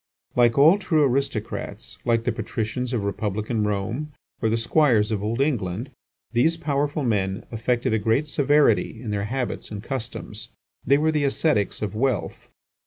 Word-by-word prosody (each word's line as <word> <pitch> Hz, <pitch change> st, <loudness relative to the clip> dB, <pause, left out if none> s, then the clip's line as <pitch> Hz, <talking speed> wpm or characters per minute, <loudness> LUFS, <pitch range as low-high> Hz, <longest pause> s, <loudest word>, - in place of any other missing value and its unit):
Like 120 Hz, 0 st, +4 dB
all 160 Hz, +8 st, +7 dB
true 165 Hz, -6 st, +2 dB
aristocrats, 135 Hz, -5 st, -2 dB
like 115 Hz, -1 st, +2 dB
the -, -, +1 dB
patricians 120 Hz, +2 st, -3 dB
of 120 Hz, -5 st, -1 dB
republican 105 Hz, +2 st, -1 dB
Rome 110 Hz, +9 st, -2 dB, 0.3 s
or 110 Hz, -, +2 dB
the 115 Hz, -, +1 dB
squires 115 Hz, -3 st, +3 dB
of 105 Hz, -3 st, -1 dB
old 115 Hz, +3 st, -1 dB
England, 120 Hz, -4 st, -1 dB, 0.4 s
these 140 Hz, +8 st, +2 dB
powerful 145 Hz, -1 st, -1 dB
men 100 Hz, -5 st, 0 dB
affected 115 Hz, 0 st, 0 dB
a 110 Hz, -, +2 dB
great 115 Hz, +8 st, +1 dB
severity 145 Hz, -6 st, +2 dB
in 115 Hz, -3 st, -5 dB
their 100 Hz, -1 st, -1 dB
habits 125 Hz, +2 st, -3 dB
and 105 Hz, -1 st, -6 dB
customs. 130 Hz, -4 st, -6 dB, 0.3 s
They 140 Hz, -, +4 dB
were 155 Hz, +2 st, +2 dB
the 150 Hz, -2 st, +1 dB
ascetics 135 Hz, -8 st, +1 dB
of 105 Hz, -, -3 dB
wealth. 130 Hz, +4 st, -1 dB
120 Hz, 160 wpm, -24 LUFS, 105-140 Hz, 0.4 s, all